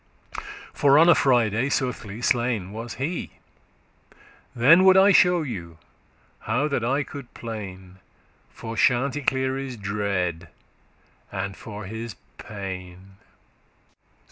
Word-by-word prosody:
(For 140 0 +4
on 165 +3 +6
a - - +9
Friday, 120 -2 +2
soothly, 120 -5 -3
slain 120 -7 0
was 115 +1 -6
he), 160 +7 -4 1.2
Then 150 +10 +6
would 190 0 +7
I 195 +1 +7
shew 180 -3 +4
you 85 - -7 0.6
how 125 +7 0
that 140 -5 -1
I 135 +5 +1
could 140 -2 -10
plain* 115 -2 -6
*lament 95 0 -15 0.5
For 115 0 -8
Chanticleere's 130 +1 0
dread, 100 -5 -2 0.8
and 95 0 -4
for 105 -1 -9
his 110 +2 -6 0.2
pain. 95 -2 -8
115 Hz, 110 wpm, -24 LUFS, 100-135 Hz, 1.2 s, a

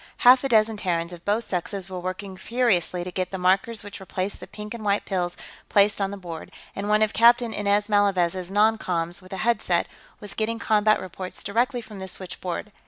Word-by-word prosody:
Half 250 +1 +8
a 275 - 0
dozen 220 -2 +3
Terrans, 170 -3 -1
of 170 -1 -11
both 215 +3 0
sexes, 185 +1 -3
were 185 -1 -5
working 185 +2 -5
furiously 190 -5 0
to 180 - -6
get 185 0 -2
the 190 - -4
markers 195 +4 +1
which 205 0 -8
replaced 190 +1 -3
the - - -9
pink 210 +1 -8
and 230 -2 -7
white 205 0 +1
pills 180 -2 -2 0.3
placed 205 0 +3
on 195 - +1
the 200 - -6
board, 170 -4 -8 0.2
and 200 +1 -3
one 215 +1 +4
of 215 - 0
Captain 235 0 +5
Inez 205 0 +1
Malavez's 190 -4 +2
non 215 +3 +3
coms, 170 -1 -2
with 185 - -16
a 190 - -4
headset, 235 0 +2 0.3
was 205 -1 -7
getting 225 +1 -1
combat 215 -1 +3
reports 185 0 -7
directly 240 +5 0
from 215 -3 -11
the 190 - -6
switchboard. 185 +2 -5
200 Hz, 205 wpm, -25 LUFS, 185-215 Hz, 0.3 s, Half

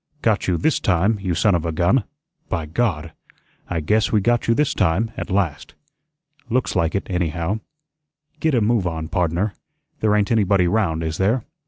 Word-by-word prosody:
"Got 110 -3 +1
you 90 -2 +1
THIS 155 - +1
time, 100 +4 +1
you 90 -3 -1
son 100 +4 +3
of 85 -2 +1
a 85 - -2
gun! 90 +9 +2 0.4
By 85 -4 -2
God! 80 -3 -1 0.6
I 85 -2 -1
guess 110 +7 +1
we 110 - +4
got 120 +4 +1
you 115 - +3
THIS 145 0 +1
time, 95 +4 +1
at - - -5
last. 90 -7 -1 0.7
Looks 125 +2 0
like 85 -1 +1
it, 100 - -1
anyhow. 90 +2 -1 0.8
GET 160 -3 +1
a 120 - +3
move 105 -3 +2
on, 80 -2 -4
pardner. 90 +2 0 0.5
There 105 -1 +2
ain't 105 +1 +1
anybody 100 -5 +3
'round, 85 -5 0
is 80 0 -3
there? 110 +5 +1
95 Hz, 180 wpm, -21 LUFS, 85-110 Hz, 0.8 s, we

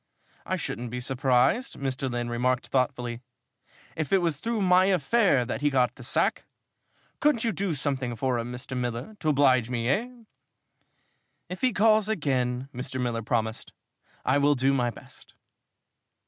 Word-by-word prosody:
"I - - 0
shouldn't 120 +1 -4
be 125 +2 -4
surprised," 130 - +1
Mr. 135 0 -2
Lynn 120 -1 -3
remarked 125 +1 -1
thoughtfully, 125 -3 -1 0.7
"if 155 -4 -3
it 195 - +5
was 170 -5 0
through 225 +4 -2
my 185 0 +5
affair 185 - +3
that - - -4
he 145 - +3
got 125 -3 +2
the 125 - -14
sack. 125 - 0 0.7
Couldn't 290 -6 +2
you 230 - +1
do 195 -5 -2
something 135 -4 -1
for 125 0 0
him, 120 +1 -4
Mr. 125 +1 -7
Miller 125 - -4
to 155 - 0
oblige 130 -5 +3
me, 120 -2 -2
eh?" 220 - +1 1.4
"If 180 +1 -7
he 255 - +3
calls 215 0 +3
again," 130 - -1
Mr. 130 +1 -5
Miller 120 -2 -1
promised, 110 0 -2 0.5
"I 135 +2 +3
will 145 +1 +4
do 135 +1 +2
my 125 -3 +1
best." - - -14
130 Hz, 160 wpm, -27 LUFS, 125-170 Hz, 1.4 s, it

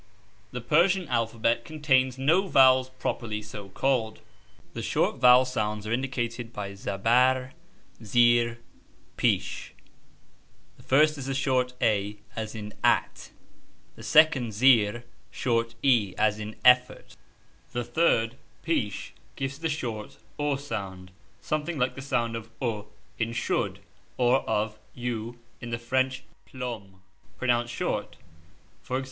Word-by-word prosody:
The 125 - -6
Persian 175 +8 +2
alphabet 115 -1 0
contains 130 -4 +1
no 165 +9 +2
vowels, 130 -4 +5
properly 115 -4 -4
so 105 -2 -9
called. 115 0 0 0.5
The - - -5
short - - 0
vowel 125 +1 +7
sounds 105 -4 -2
are 110 - -4
indicated 120 -2 -3
by 100 -3 -5
(') - - -9
zabarr, 125 +7 +1 0.5
(J) - - -14
zeerr, 120 +1 +3 0.3
( - - -34
) - - -34
jnsh. - - 0 1.1
The - - -16
first 150 +2 +3
is 135 - -6
a 135 - -2
short 130 -2 0
(a) 105 -1 +1 0.2
as 110 0 -5
in 105 -1 -7
at; - - +1 0.7
the - - -13
second 140 -7 +4
(zeerr) 120 -1 +4 0.3
short 115 -2 -1
(e) 115 -9 +3
as 105 0 +2
in 105 0 -6
effort; 125 0 +4 0.6
the 120 - -2
third 120 -2 +1 0.3
(jnsh) 125 -12 -2 0.2
gives 135 +1 -4
the 165 0 -1
short 115 -8 -5 0.2
(u) 145 -1 0
sound 95 -9 -6 0.3
something 155 +2 -2
like 125 -1 +1
the 135 - -8
sound 120 -4 -1
of 115 0 -7
ou 110 -4 -3 0.3
in 115 0 -1
should, 120 - -1 0.4
or 125 +1 +4
of 105 +1 -1 0.2
u 120 -1 -4 0.2
in 120 - -7
the 115 - -2
French 130 +2 -1 0.2
plume 110 -7 -7 0.3
pronounced 120 -1 0
short: - - -3 0.7
ex. 130 +1 0
120 Hz, 135 wpm, -27 LUFS, 110-130 Hz, 1.1 s, vowel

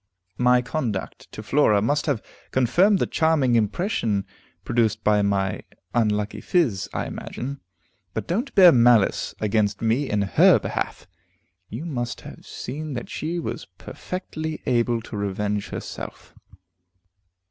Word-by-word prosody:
"My 125 0 +4
conduct 120 -8 -4
to 110 - -8
Flora 110 -4 +3
must 145 +9 0
have 135 -7 0 0.3
confirmed 175 - +3
the - - +1
charming 160 -6 +2
impression 110 - 0 0.4
produced 115 -2 0
by 105 -1 +3
my 100 -1 0 0.3
unlucky 105 -3 0
phiz, 135 - +1
I - - -2
imagine. 140 +3 -6 0.5
But - - -2
don't 230 +11 -2
bear 185 -4 +9
malice 120 -5 +3
against 105 -1 +1
me 115 +5 0
in 105 -1 +1
her 95 - +5
behalf; - - -4 0.6
you 125 +10 -6
must 120 -7 -4
have - - -12
seen 150 +3 -6
that 120 -2 -6
she 165 +3 -3
was 170 - -5
perfectly 160 -4 -6
able 120 -1 +1
to 115 - -8
revenge 100 0 -2
herself." - - -7
120 Hz, 130 wpm, -24 LUFS, 105-150 Hz, 0.6 s, bear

